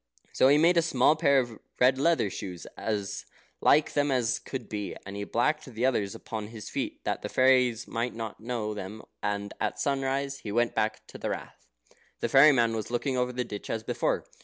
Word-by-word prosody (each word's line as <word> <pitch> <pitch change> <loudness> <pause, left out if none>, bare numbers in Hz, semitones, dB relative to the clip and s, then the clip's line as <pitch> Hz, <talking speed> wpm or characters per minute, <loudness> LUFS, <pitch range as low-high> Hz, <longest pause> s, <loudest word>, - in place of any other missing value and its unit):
So - - +5
he 145 +2 +6
made 170 +3 +4
a - - +6
small 150 -2 +3
pair 140 -3 +3
of 120 -4 -1 0.2
red 130 +1 +4
leather 160 - +2
shoes, 90 -3 -6
as 100 - -3 0.3
like 150 +1 +4
them 145 0 +2
as 125 -5 +1
could 130 -4 -6
be, 105 -2 -4
and 100 +1 -7
he 100 0 -4
blacked 135 +9 0
the 125 -2 -2
others 105 -7 0
upon 110 -2 -6
his 110 -2 -9
feet, - - -4
that - - -2
the - - -4
fairies 125 -2 +3
might 120 +1 -2
not 115 -2 -6
know 115 -2 -3
them, 105 +1 -7 0.2
and 100 0 -2
at - - -1
sunrise 140 0 -1
he 105 - -6
went 120 +2 +1
to 110 0 -2
the - - -3
Rath. - - -7 0.5
The - - -1
fairy 140 +3 +8
man 115 -4 +2
was 110 -2 -4
looking 125 +3 -1
over 125 0 0
the 125 0 -2
ditch 105 -3 -7
as 115 -1 -2
before. - - -1
120 Hz, 205 wpm, -28 LUFS, 110-135 Hz, 0.5 s, fairy